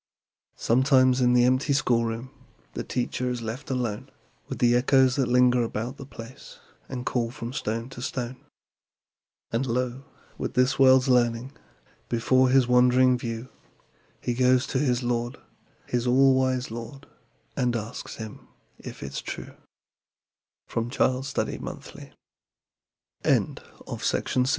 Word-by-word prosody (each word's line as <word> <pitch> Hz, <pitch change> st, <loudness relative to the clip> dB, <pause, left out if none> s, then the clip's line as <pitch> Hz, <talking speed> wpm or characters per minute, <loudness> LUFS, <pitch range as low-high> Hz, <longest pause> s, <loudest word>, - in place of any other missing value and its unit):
Sometimes, 130 Hz, +1 st, +3 dB
in 125 Hz, 0 st, +4 dB
the 120 Hz, 0 st, +5 dB
empty 130 Hz, +4 st, +2 dB
schoolroom, 120 Hz, -2 st, 0 dB, 0.4 s
The -, -, -4 dB
teacher 125 Hz, 0 st, -2 dB
is 120 Hz, -2 st, -3 dB
left 115 Hz, +6 st, -6 dB
alone 120 Hz, -5 st, -2 dB, 0.4 s
With -, -, -5 dB
the 120 Hz, -1 st, +3 dB
echoes 130 Hz, +1 st, +4 dB
that 135 Hz, -3 st, +1 dB
linger 125 Hz, 0 st, +4 dB
about 115 Hz, +3 st, -3 dB
the 135 Hz, -, -9 dB
place 115 Hz, -1 st, -11 dB, 0.3 s
And 125 Hz, -1 st, -5 dB
call 120 Hz, -2 st, 0 dB
from 120 Hz, 0 st, -7 dB
stone 115 Hz, -3 st, -3 dB
to 130 Hz, -2 st, -9 dB
stone. 125 Hz, -1 st, -4 dB, 1.1 s
And, 120 Hz, +4 st, -1 dB
lo, 125 Hz, +2 st, -2 dB, 0.4 s
with -, -, -4 dB
this 125 Hz, +2 st, +2 dB
world's 130 Hz, -1 st, +6 dB
learning 120 Hz, 0 st, +2 dB, 0.6 s
Before 130 Hz, +2 st, +3 dB
his 130 Hz, -1 st, +4 dB
wondering 125 Hz, +1 st, +5 dB
view, 120 Hz, 0 st, -5 dB, 0.7 s
He 120 Hz, -, -2 dB
goes 125 Hz, +1 st, +3 dB
to 130 Hz, -, +2 dB
his 125 Hz, -3 st, +1 dB
Lord 120 Hz, 0 st, -1 dB, 0.5 s
his 120 Hz, 0 st, -1 dB
all 135 Hz, +2 st, +5 dB
wise 130 Hz, -2 st, 0 dB
Lord, 120 Hz, +5 st, -8 dB, 0.5 s
And 125 Hz, -3 st, 0 dB
asks 115 Hz, 0 st, -5 dB
Him 110 Hz, -2 st, -9 dB, 0.3 s
if -, -, -9 dB
it's 70 Hz, 0 st, -5 dB
125 Hz, 115 wpm, -26 LUFS, 120-130 Hz, 1.1 s, world's